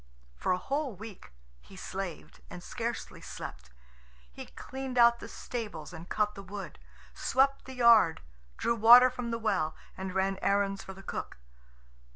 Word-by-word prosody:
For - - -1
a 180 - +3
whole 275 +4 -2
week 205 - -11 0.3
he 60 - -16
slaved, - - -6
and - - -9
scarcely - - -5
slept. 60 +1 -8 0.6
He - - -9
cleaned 265 -1 -6
out 235 0 +6
the - - -8
stables 205 -10 -6
and 165 +1 -10
cut 210 -1 +1
the 195 - -9
wood, 195 - -8 0.3
swept 270 - +1
the 265 - -9
yard, 225 -9 +6 0.4
drew - - +1
water 240 +3 +8
from 245 -1 -5
the 230 - -1
well, 200 -8 0 0.2
and 190 0 -5
ran 190 0 +1
errands 200 0 +1
for 190 - -9
the 195 - -12
cook. - - -5
205 Hz, 160 wpm, -30 LUFS, 185-235 Hz, 0.6 s, water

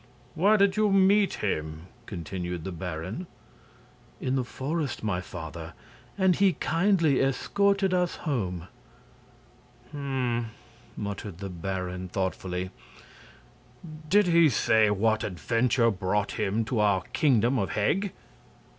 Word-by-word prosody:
"Where 205 +6 +4
did 200 0 +3
you 215 -1 +3
meet 195 +1 +4
him?" 80 -3 -3 0.2
continued 90 -2 -5
the 95 - -4
baron. 90 - -5 0.9
"In 130 0 -1
the 130 - +1
forest, 140 +1 -3
my 95 -4 -1
father, 80 -4 -8 0.4
and 190 -2 +4
he 195 0 +4
kindly 165 -4 +2
escorted 195 +8 +1
us 180 -1 +1
home." 95 - -3 1.2
"Hm!" 130 -5 -2 0.5
muttered 100 -3 -5
the 100 +1 -6
baron, 90 +1 -4
thoughtfully. 95 -1 -3 1.4
"Did 205 +2 +5
he 170 -2 +5
say 110 -3 +3
what 110 +2 +1
adventure 115 - +1
brought 100 +1 -1
him 110 +3 -1
to 120 0 -1
our 100 -3 +3
Kingdom 125 -4 +3
of 100 - -1
Heg?" 190 - +1
115 Hz, 115 wpm, -27 LUFS, -, 1.4 s, Did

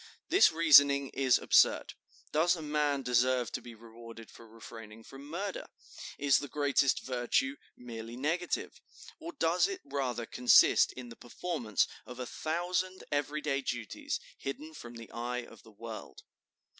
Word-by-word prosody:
This 375 - +6
reasoning 145 -4 +6
is 130 -2 +2
absurd. - - +3 0.4
Does 170 +4 +3
a 160 - -7
man 150 -2 0
deserve 125 -1 +1
to - - -4
be 120 -1 -11
rewarded 115 0 -13
for 115 - -15
refraining 115 0 -12
from 135 +4 -12
murder? 190 +4 -5 0.5
Is 140 -1 +3
the 145 - -6
greatest 140 -1 +1
virtue 130 +2 0 0.2
merely 115 -1 -8
negative? 165 +6 -2 0.4
or 335 +1 -7
does 175 - +2
it 385 -2 -6
rather 125 -4 -3
consist 125 +1 +5
in 125 -2 -9
the 115 - -11
performance 120 - -2 0.2
of 125 - -9
a 125 - -4
thousand 175 +6 -2
every 145 +1 -1
day 140 -2 -1
duties, 120 -5 -4 0.2
hidden 150 +3 -6
from 120 -5 -10
the 115 -1 -11
eye 120 +1 -4
of 115 -3 -15
the 115 - -17
world?" 110 +1 -9
135 Hz, 150 wpm, -31 LUFS, 120-155 Hz, 0.5 s, This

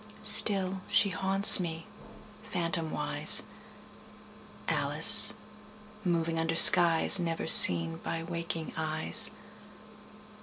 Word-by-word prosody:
Still 190 -2 -1
she 200 - -2
haunts 195 +2 +2
me, 165 -2 -11 0.6
phantomwise, 165 -2 -1 1.2
Alice - - 0 0.7
moving 165 -2 -7
under 165 0 -7
skies 170 +3 +5
Never 165 -2 -9
seen 85 - +4
by 165 0 -11
waking 170 -1 -11
eyes. 155 - -2
165 Hz, 80 wpm, -23 LUFS, 160-180 Hz, 1.2 s, skies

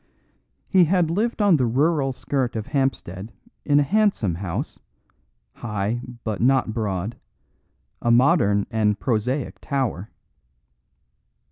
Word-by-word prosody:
He 185 -3 +5
had 170 -1 +2
lived 215 +4 0
on 195 -5 +5
the 125 -3 +1
rural 140 +3 +1
skirt 130 -1 -2
of 110 -2 -3
Hampstead 115 - -2 0.3
in 145 -1 +3
a - - +4
handsome 195 - +1
house, 85 0 -5 0.7
high 110 +1 -3 0.2
but 110 -3 -3
not 130 -2 +2
broad, 105 -1 -3 0.8
a 120 - 0
modern 120 - +4
and 105 -2 +1
prosaic 125 +3 -1
tower. 125 -8 -2
125 Hz, 115 wpm, -23 LUFS, 105-145 Hz, 0.8 s, He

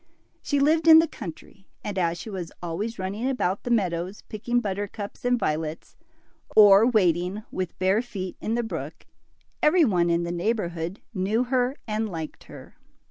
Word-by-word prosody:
She 285 - 0
lived 315 +3 +3
in 320 -1 +10
the 325 +1 +5
country, 195 - -10 0.2
and 205 - -4
as 170 -2 0
she 175 +6 -8
was 180 -4 -5
always 185 +7 -4
running 200 +7 -2
about 200 -7 -1
the - - -6
meadows 185 -4 -1
picking 240 +3 -1
buttercups 205 -1 -5
and 245 0 +2
violets, 155 -4 -3 0.6
or 205 +1 +8
wading 185 -2 +1
with 185 -2 -4
bare 190 +4 +2
feet 195 -7 -6
in 225 - -1
the 240 - 0
brook, 225 - -6 0.6
every 320 +2 +5
one 175 -7 +2
in 170 0 +1
the 170 - -3
neighborhood 175 -2 -2
knew 210 +4 +1
her 250 +1 0
and 215 0 -1
liked 160 -4 -7
her. - - -13
205 Hz, 165 wpm, -25 LUFS, 175-235 Hz, 0.6 s, in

